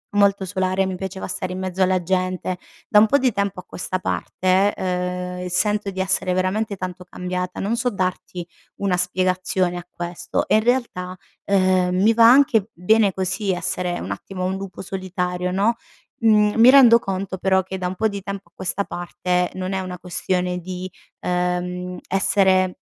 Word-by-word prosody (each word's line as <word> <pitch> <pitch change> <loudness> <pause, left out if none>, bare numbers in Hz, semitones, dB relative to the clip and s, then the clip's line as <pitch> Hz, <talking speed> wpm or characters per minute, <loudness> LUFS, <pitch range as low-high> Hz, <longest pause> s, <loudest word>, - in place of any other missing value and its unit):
molto 200 -1 +3
solare. 185 0 0
Mi 190 -1 -3
piaceva 190 +1 -5
stare 185 0 -3
in 185 - -5
mezzo 185 0 -1
alla 185 0 +2
gente. 185 0 -1 0.3
Da 210 - +6
un 210 - +7
po' 280 - +4
di 255 -4 +1
tempo 200 -2 -1
a - - -9
questa 185 +1 -4
parte, 185 +2 +1
ehm, 180 0 -3
sento 205 +3 +1
di 190 - -7
essere 185 -1 +1
veramente 195 +3 -1
tanto 185 -1 -6
cambiata. 180 0 -4
Non 210 +4 0
so 245 +1 0
darti 185 -3 -3 0.3
una 195 -2 0
spiegazione 185 0 0
a 175 - -7
questo. 175 0 -3
E - - +3
in 215 - +3
realtà, 225 -7 -1 0.3
ehm, 185 -2 +2
mi 220 +3 +5
va 230 0 +7
anche 240 -5 +4
bene 205 +3 +3
così 190 +2 -1
essere 180 0 -1
un - - -5
attimo 185 -1 -5
un 185 +1 -1
lupo 195 -2 -7
solitario 180 -1 -3
no, 205 +5 +2 0.4
mhmm, 210 -2 +4
mi 240 - +9
rendo 255 -4 +8
conto 195 -2 -4
però, 190 +1 +2
che 190 +1 -6
da 185 -1 -2
un 180 - -4
po' 220 - +1
di 200 -2 -5
tempo 200 0 -6
a - - -55
questa 190 +2 -2
parte, 180 0 -2
non 185 +1 -3
è 190 - -1
una 180 -1 -6
questione 180 0 -2
di, 185 +1 -6 0.3
ehm 180 0 -2
essere, 190 -1 +2
185 Hz, 180 wpm, -22 LUFS, 180-200 Hz, 0.4 s, mi